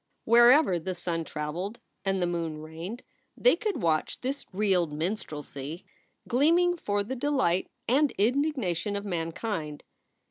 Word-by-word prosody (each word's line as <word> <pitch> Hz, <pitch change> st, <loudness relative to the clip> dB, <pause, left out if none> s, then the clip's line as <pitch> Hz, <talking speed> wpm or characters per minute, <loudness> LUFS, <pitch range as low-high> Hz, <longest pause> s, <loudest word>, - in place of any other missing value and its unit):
Wherever 240 Hz, -, +6 dB
the 185 Hz, +3 st, -4 dB
sun 170 Hz, -2 st, -2 dB
traveled 165 Hz, +9 st, -4 dB, 0.2 s
and 195 Hz, -1 st, 0 dB
the 180 Hz, -, +2 dB
moon 165 Hz, -3 st, -2 dB
reigned 165 Hz, +9 st, -7 dB, 0.3 s
they -, -, +5 dB
could 425 Hz, -, -3 dB
watch 160 Hz, -2 st, 0 dB
this 270 Hz, +3 st, -3 dB
reeled 185 Hz, -5 st, +1 dB
min 160 Hz, +7 st, -1 dB
strelsy 150 Hz, -3 st, -7 dB, 0.4 s
gleaming 335 Hz, +8 st, +4 dB
for 205 Hz, -10 st, -1 dB
the 250 Hz, +6 st, -4 dB
delight 260 Hz, -10 st, +1 dB, 0.2 s
and 280 Hz, +5 st, +4 dB
indignation 225 Hz, -, +1 dB
of 200 Hz, 0 st, -4 dB
mankind. 165 Hz, -3 st, -3 dB
195 Hz, 135 wpm, -28 LUFS, 165-250 Hz, 0.4 s, Wherever